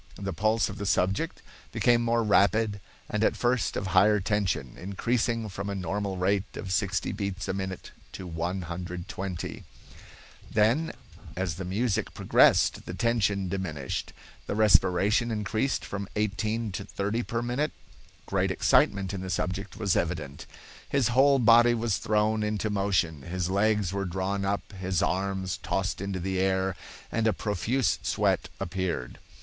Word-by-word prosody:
The 100 -1 -4
pulse 110 +6 +2
of 95 - -7
the 100 - -3
subject 95 +1 0 0.3
became 120 -1 +3
more 115 0 +2
rapid 105 0 +3 0.3
and 105 +1 -1
at - - +3
first 120 -1 +1
of 100 - -2
higher 95 +3 +4
tension, 95 - -1
increasing 115 +4 -1
from 100 0 -5
a 100 - -2
normal 95 +1 -2
rate 95 +2 0
of 95 -3 -5
60 100 0 0
beats 100 -1 -4
a - - -1
minute 95 -1 -5 0.2
to 95 - -7
120. 90 +1 -4 0.9
Then, 115 +10 +2 0.5
as 95 -3 -1
the 95 +4 -6
music 100 +4 -1
progressed, - - +4
the 90 - -5
tension 100 -4 +1
diminished. 85 -8 -3 0.4
The - - -2
respiration 105 +2 +4
increased 110 +4 -1
from 100 -1 -5
18 110 +1 -1
to - - -4
30 105 +4 -2
per 115 0 -3
minute. 125 +6 -1 0.5
Great - - 0
excitement 100 0 +2
in 95 - -4
the 95 - -5
subject 90 +2 -3
was 100 -5 +1
evident. 80 -5 -2 0.4
His 135 -4 +2
whole 135 +3 +5
body 120 0 +6
was 115 -3 0
thrown 110 +1 +1
into 105 0 -1
motion, 95 -7 0
his 90 +4 -3
legs 100 -1 +2
were 100 0 -1
drawn 95 +2 -2
up, 100 +1 -2
his 95 -2 -1
arms 95 0 -1
tossed - - -1
into 100 -1 -3
the 95 +1 -2
air, 95 0 +1 0.4
and 115 0 +1
a 110 - +3
profuse 110 +5 0
sweat - - +1
appeared. 90 -8 -3
100 Hz, 150 wpm, -28 LUFS, 95-110 Hz, 0.9 s, body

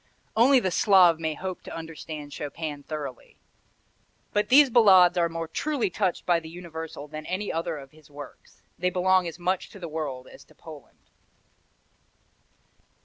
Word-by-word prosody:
Only 255 +4 +6
the 190 -6 -1
Slav 180 -4 +5
may 160 -1 -2
hope 185 +1 -6
to - - -9
understand 155 -2 -8
Chopin 145 0 -5
thoroughly. 145 -4 -7 1.0
But 210 0 +1
these 275 +1 +7
Ballades 190 -6 +6
are 170 -1 +2
more 165 0 -5
truly 270 - -1
touched 185 -2 -1
by 175 -1 +3
the 160 -1 -11
universal 160 -3 -8
than 155 +1 -8
any 195 +3 -3
other 165 -1 -2
of 135 -2 -11
his 155 -1 -20
works. 145 -1 -13 0.2
They 180 +1 +1
belong 185 0 +2
as 165 - -7
much 180 +1 -2
to 200 - -13
the 175 - -6
world 150 -5 -5
as - - -14
to - - -23
Poland. - - -14
170 Hz, 160 wpm, -26 LUFS, 155-185 Hz, 1.0 s, these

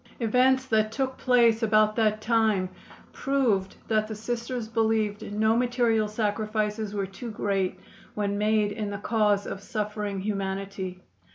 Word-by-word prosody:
Events 255 +3 +3
that 215 -3 +1
took 265 +2 -2
place 235 -3 +4
about 215 -1 +3
that 215 -2 +1
time 215 -5 +2 0.4
proved 235 -9 0
that 215 -1 +1
the 220 - -5
Sisters 235 +1 -4
believed 220 -2 0
no 220 +2 +2
material 240 -3 +2
sacrifices 215 0 -2
were 200 -1 -1
too 195 +5 -8
great 195 -3 -1 0.4
when 205 -1 -1
made 210 0 +2
in 210 0 -3
the 200 - -4
cause 210 -1 +1
of 195 - -5
suffering 210 -1 -3
humanity. 195 -2 -4
215 Hz, 140 wpm, -27 LUFS, 205-225 Hz, 0.4 s, place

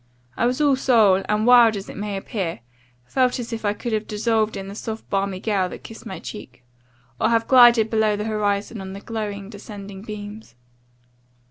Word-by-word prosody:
I 240 - +1
was 250 +3 -1
all 290 -2 +4
soul, 220 -8 +4
and 210 +1 +1
(wild 240 -3 +7
as 195 - -7
it - - -9
may 205 0 -4
appear) 190 - -4 0.4
felt 255 - +1
as 240 -1 -5
if 225 - -5
I 205 -1 +1
could 235 +2 -4
have 215 0 -1
dissolved 220 0 0
in 195 - -6
the 195 - -7
soft 220 +1 -6
balmy 195 -1 -1
gale 195 -3 0
that - - -10
kissed 225 +1 -10
my 190 - -6
cheek, 125 - -10 0.6
or - - +2
have 230 -1 +1
glided 240 -4 +6
below 220 -2 +2
the 210 - -3
horizon 210 -1 -1
on 190 0 -7
the 195 - -7
glowing, 205 -2 -5
descending 200 -2 -9
beams. 210 - -9
210 Hz, 195 wpm, -22 LUFS, 200-230 Hz, 0.6 s, wild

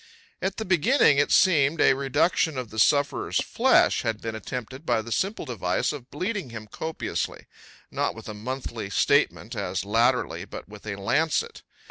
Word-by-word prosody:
At 190 +1 -2
the 220 - -3
beginning, 185 - +4
it 145 - +2
seemed, 160 -5 +4
a - - +6
reduction 145 +3 +1
of 125 -4 -5
the 110 - -4
sufferer's 145 +5 +2
flesh - - +3
had 110 -1 -2
been 115 -1 -5
attempted 125 +4 -6
by 120 -7 0
the 115 - -9
simple 195 - -1
device 95 -1 -1
of 135 -4 -9
bleeding 185 - -3
him 115 -2 -8
copiously 160 +9 -4 0.5
not - - -1
with - - -10
a 110 - -5
monthly 115 -1 -5
statement, - - +1
as 90 +1 -3
latterly, 115 +4 +1
but - - -9
with 105 +1 -13
a 100 - -3
lancet. 150 +11 0
130 Hz, 165 wpm, -25 LUFS, 110-160 Hz, 0.5 s, a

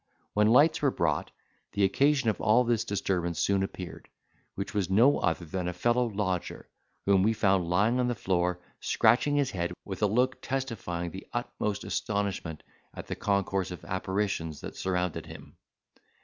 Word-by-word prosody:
When 105 0 +4
lights 145 +8 +5
were 145 - +4
brought, - - 0 0.4
the 100 - +1
occasion 135 +6 +3
of - - -8
all 115 +3 +4
this 120 -2 +1
disturbance 90 -4 -1
soon 100 -1 +2
appeared; 90 -4 -6 0.5
which 100 - -4
was 100 -3 0
no 120 +9 +5
other 85 0 0
than 90 +2 -3
a 90 - -2
fellow 120 +7 +2
lodger, 95 -5 -3 0.4
whom 100 -1 +4
we 110 +4 +3
found 95 -5 +2
lying 105 +8 +2
on 125 - +2
the 120 - 0
floor, 90 -2 0 0.2
scratching 145 +4 +3
his 140 -2 +1
head, 85 -1 -2
with 95 -1 -6
a 105 - +4
look 125 +5 +1
testifying 115 -10 -3
the 95 +3 -9
utmost 105 -4 -2
astonishment 100 -6 -2 0.3
at - - -7
the - - -4
concourse 100 -2 0
of 90 - -8
apparitions 95 -4 -2
that - - -7
surrounded 90 -2 -2
him. - - -12
100 Hz, 165 wpm, -29 LUFS, 90-115 Hz, 0.5 s, lights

